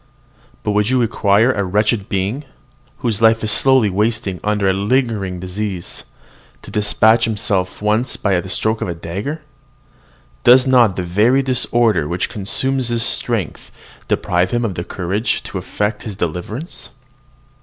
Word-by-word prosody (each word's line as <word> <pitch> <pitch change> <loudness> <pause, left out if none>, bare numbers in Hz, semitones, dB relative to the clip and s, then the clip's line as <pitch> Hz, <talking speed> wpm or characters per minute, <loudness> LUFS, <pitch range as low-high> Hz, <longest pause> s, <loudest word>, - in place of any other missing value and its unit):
But 105 - 0
would 105 +1 +1
you 130 0 +2
require 115 0 +3
a 100 -5 -1
wretched 105 +2 0
being, 100 +9 -2 0.6
whose 110 -2 0
life 115 0 +4
is 110 - +1
slowly 130 -5 +4
wasting 105 -2 -1
under 105 -1 0
a 95 - +3
lingering 100 -3 -1
disease, 95 0 -5 0.6
to - - -11
despatch 110 +2 +3
himself 100 -4 -1
at - - -19
once 110 +5 0
by 95 -4 +1
the 95 - -10
stroke 110 +3 -1
of - - -2
a 85 - -3
dagger? 100 - -5 1.0
Does 125 +2 +6
not 120 -7 +4
the 90 - -2
very 110 +10 +2
disorder 120 - +1
which 90 +3 -2
consumes 130 +6 -1
his 120 -1 0
strength 115 -8 -2 0.4
deprive 90 +1 0
him 120 0 0
of 105 - -2
the 85 - -4
courage 95 +6 -2
to - - -5
effect 105 0 -3
his 105 -3 -7
deliverance? 95 - -5
105 Hz, 155 wpm, -18 LUFS, 95-120 Hz, 1.0 s, Does